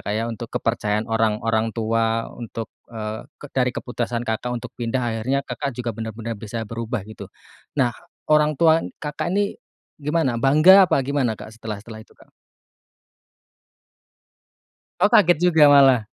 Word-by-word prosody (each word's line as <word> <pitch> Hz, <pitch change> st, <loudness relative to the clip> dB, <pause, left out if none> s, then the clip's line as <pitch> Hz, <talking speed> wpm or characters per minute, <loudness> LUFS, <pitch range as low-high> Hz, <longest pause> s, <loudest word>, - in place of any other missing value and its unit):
Kak, 105 Hz, -, -2 dB
ya 110 Hz, +2 st, -1 dB
untuk 115 Hz, 0 st, -6 dB
kepercayaan 105 Hz, -2 st, -1 dB
orang 110 Hz, -1 st, +1 dB
orang 115 Hz, 0 st, 0 dB
tua 115 Hz, 0 st, 0 dB
untuk, 115 Hz, -1 st, -7 dB, 0.2 s
eee, 110 Hz, -1 st, -6 dB, 0.2 s
ke -, -, -8 dB
dari 125 Hz, -1 st, +1 dB
keputusan 120 Hz, -1 st, -3 dB
Kakak 115 Hz, +2 st, -2 dB
untuk 120 Hz, -, -8 dB
pindah, 120 Hz, +2 st, -2 dB
akhirnya 120 Hz, +4 st, -1 dB
Kakak 140 Hz, -, -4 dB
juga 120 Hz, -2 st, -3 dB
bener-bener 115 Hz, 0 st, -5 dB
bisa 110 Hz, +2 st, -5 dB
berubah 115 Hz, +1 st, -4 dB
gitu. 110 Hz, +1 st, -10 dB, 0.5 s
Nah, 125 Hz, -4 st, +2 dB, 0.4 s
orang 150 Hz, -1 st, +3 dB
tua 160 Hz, +1 st, +4 dB, 0.2 s
Kakak 150 Hz, -1 st, -3 dB
ini 200 Hz, +1 st, 0 dB, 0.4 s
gimana? 150 Hz, -4 st, 0 dB
Bangga 155 Hz, +9 st, +7 dB
apa -, -, +3 dB
gimana, 130 Hz, -5 st, 0 dB
Kak, 110 Hz, -, -11 dB
setelah-setelah 110 Hz, 0 st, -8 dB
itu, -, -, -25 dB
Kak? -, -, -21 dB, 2.7 s
Oh, 205 Hz, -, +4 dB
kaget 175 Hz, -6 st, +5 dB
juga 160 Hz, -4 st, +6 dB
malah. 135 Hz, -6 st, +6 dB
120 Hz, 145 wpm, -22 LUFS, 110-140 Hz, 2.7 s, Bangga